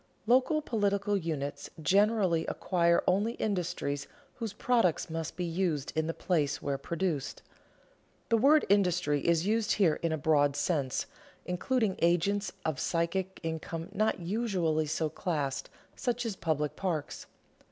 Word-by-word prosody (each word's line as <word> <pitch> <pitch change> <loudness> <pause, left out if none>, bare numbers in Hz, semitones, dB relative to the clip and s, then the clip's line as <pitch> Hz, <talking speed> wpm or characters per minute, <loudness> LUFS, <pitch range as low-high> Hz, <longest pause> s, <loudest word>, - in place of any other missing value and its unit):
Local 260 +6 +3
political 205 -4 0
units 155 -6 -3
generally 195 -1 +3
acquire 170 -2 +2
only 205 +5 +2
industries 175 - -2 0.3
whose 225 -4 -3
products 205 -7 +1
must 165 -1 -4
be 180 - -1
used 165 -4 -1
in 160 0 0
the 165 - -1
place 150 -6 0
where 140 -1 -2
produced. 170 -5 -3 0.9
The 230 - +4
word 295 +5 +5
industry 180 -7 +2
is 170 +2 +2
used 220 +1 +2
here 175 -7 +2
in 165 - 0
a 160 - 0
broad 145 -2 +3
sense, 145 -3 0 0.4
including 205 +3 0
agents 175 +4 +2
of 160 -3 -1
psychic 180 +3 -1
income 165 0 -4
not 215 0 +1
usually 175 -5 0
so 160 +1 0
classed, 150 -4 -3 0.3
such 245 -2 -2
as 220 -4 -2
public 155 -4 -1
parks. 165 -6 -3
175 Hz, 135 wpm, -30 LUFS, 160-205 Hz, 0.9 s, word